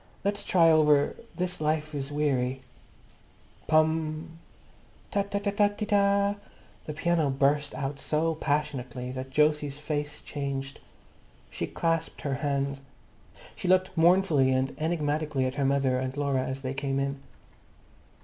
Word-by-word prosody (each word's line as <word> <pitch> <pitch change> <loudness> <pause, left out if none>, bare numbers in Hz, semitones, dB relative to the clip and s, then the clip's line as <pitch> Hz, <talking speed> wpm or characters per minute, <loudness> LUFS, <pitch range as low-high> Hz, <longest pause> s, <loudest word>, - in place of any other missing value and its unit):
Let's 205 +1 -1
try 165 -3 +5
over 150 -2 +4 0.2
'This 180 -1 -3
life 155 0 0
is 140 -1 -4
Weary.'" 135 -3 0 1.1
Pom! 155 +1 +1 0.7
Ta 200 - +2
ta 200 0 -3
ta 205 0 +2
Tee 205 +1 -4
ta! 200 0 +2 0.5
The 155 - -3
piano 160 -1 +1
burst 140 +2 +1
out 140 +1 -3
so 160 +3 0
passionately 135 -5 -2
that 130 0 -7
Jose's 150 -2 +2
face 150 -1 -4
changed. 135 -1 -4 0.7
She - - -3
clasped 165 -1 -1
her 140 - -2
hands. 140 -1 -1 0.7
She - - -5
looked 185 +1 +3
mournfully 165 -5 +4
and 130 +1 0
enigmatically 150 -3 0
at 130 - -1
her 140 0 -1
mother 135 -2 +2
and 130 +1 -4
Laura 140 -2 +1
as 130 +1 -5
they 130 0 -2
came 135 0 -1
in. 140 0 -2
150 Hz, 135 wpm, -28 LUFS, 135-165 Hz, 1.1 s, try